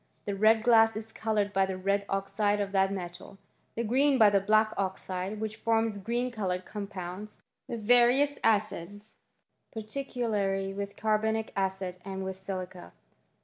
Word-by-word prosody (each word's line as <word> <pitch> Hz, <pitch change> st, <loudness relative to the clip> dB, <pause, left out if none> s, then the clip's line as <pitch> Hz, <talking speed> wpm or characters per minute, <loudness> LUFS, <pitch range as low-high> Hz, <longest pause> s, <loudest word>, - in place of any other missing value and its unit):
The 205 Hz, -, -2 dB
red 215 Hz, +2 st, +4 dB
glass 225 Hz, -2 st, +5 dB
is 220 Hz, +1 st, -6 dB
coloured 210 Hz, -3 st, -1 dB
by 195 Hz, 0 st, +2 dB
the 190 Hz, -1 st, -4 dB
red 200 Hz, +2 st, 0 dB
oxide 205 Hz, +1 st, 0 dB
of 200 Hz, -1 st, -2 dB
that 195 Hz, 0 st, +2 dB
metal; 180 Hz, 0 st, -7 dB, 0.4 s
the 235 Hz, -, -1 dB
green 265 Hz, +5 st, +3 dB
by 215 Hz, -4 st, +6 dB
the 200 Hz, -, +4 dB
black 215 Hz, +2 st, +3 dB
oxide, 190 Hz, +1 st, -3 dB
which 220 Hz, 0 st, -4 dB
forms 225 Hz, -2 st, 0 dB
green 240 Hz, +5 st, -2 dB
coloured 185 Hz, -5 st, -3 dB
compounds, 200 Hz, 0 st, -7 dB, 0.3 s
with 230 Hz, -3 st, -5 dB
various 245 Hz, +5 st, +4 dB
acids, 205 Hz, -1 st, -1 dB, 0.6 s
particularly 215 Hz, -5 st, -2 dB
with 200 Hz, 0 st, -5 dB
carbonic 220 Hz, +1 st, 0 dB
acid 190 Hz, -2 st, -2 dB
and 190 Hz, 0 st, -5 dB
with 190 Hz, 0 st, -4 dB
silica. 185 Hz, -, -7 dB
205 Hz, 145 wpm, -29 LUFS, 195-220 Hz, 0.6 s, by